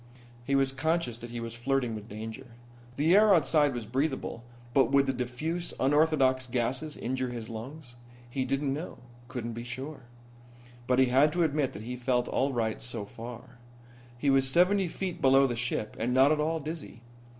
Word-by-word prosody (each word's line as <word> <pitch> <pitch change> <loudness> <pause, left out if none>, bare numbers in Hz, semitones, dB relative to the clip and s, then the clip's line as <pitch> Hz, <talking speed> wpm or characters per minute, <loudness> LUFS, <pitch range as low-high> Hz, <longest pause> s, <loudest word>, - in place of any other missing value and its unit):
He 140 +3 0
was 135 -1 +3
conscious 135 -3 -1
that 120 - -8
he 120 0 -5
was 115 0 -5
flirting 125 0 0
with 110 0 -8
danger. 110 +5 -7 0.5
The 160 +6 +4
air 210 -1 +7
outside 145 -3 +3
was 120 -2 -4
breathable, 130 0 -2 0.3
but 135 -4 +4
would 140 0 +5
the 135 - 0
diffuse, 150 +8 -3
unorthodox 135 -2 +3
gases 130 +5 -2
injure 130 +1 -2
his 120 -2 -6
lungs? 120 +3 -8 0.3
He 130 +2 -2
didn't 135 +1 -1
know, 155 +5 -6 0.3
couldn't 120 -3 -5
be 115 +1 -6
sure. 130 +3 -7 0.8
But 125 - +3
he 130 - +6
had 135 +4 +4
to 175 0 +2
admit 150 -3 0
that 105 - -8
he 125 +2 -5
felt 125 0 0
all 140 +1 0
right 115 -3 -1
so 115 -4 -4
far. 120 +2 -10 0.6
He 140 +3 +2
was 135 0 +3
seventy 180 +5 +3
feet 180 +1 -4
below 135 +1 +6
the 120 -3 -1
ship 115 -2 -3
and 120 +3 0
not 135 +3 +6
at 155 - +2
all 160 +2 0
dizzy. 155 -5 -7
130 Hz, 185 wpm, -29 LUFS, 120-150 Hz, 0.8 s, air